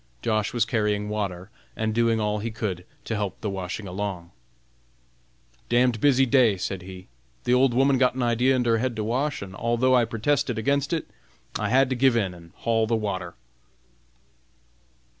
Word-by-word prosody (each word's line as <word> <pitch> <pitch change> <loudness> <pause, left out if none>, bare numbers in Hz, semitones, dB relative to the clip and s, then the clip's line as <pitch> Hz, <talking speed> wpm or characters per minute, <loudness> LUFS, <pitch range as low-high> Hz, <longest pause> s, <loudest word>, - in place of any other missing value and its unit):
Josh. 110 -2 0
was 120 -2 +1
carrying 105 -3 0
water, 100 -2 -4 0.2
and 110 0 -1
doing 115 0 +2
all 105 0 0
he 115 +3 -3
could 100 -6 -4 0.2
to - - -3
help 100 -3 -3
the 105 - -2
washing 95 +2 -5
along. 90 -2 -5 1.4
"D 120 +1 +4
d 120 -3 0
busy 135 +1 +4
to 125 - -8
day," 120 -7 +5
said 95 +1 -4
he; 90 0 -10 0.4
"the 125 - +1
old 125 -1 +3
woman 135 0 +3
got 125 -1 +3
an 130 - -1
idea 120 +3 +2
into 120 -2 +1
her 115 - +3
head 125 0 -1
to 110 - -2
wash, 130 +4 -1
and 95 0 -9
although 120 +4 +1
I 125 -2 +4
protested 125 +2 0
against 140 +5 0
it, 165 -2 -2 0.5
I - - -1
had 135 +2 +4
to - - +1
give 130 -1 +3
in 95 -5 0
and 85 -1 -14
haul 115 -1 0
the 115 - +1
water." 95 -5 -3
115 Hz, 185 wpm, -25 LUFS, 105-125 Hz, 1.4 s, day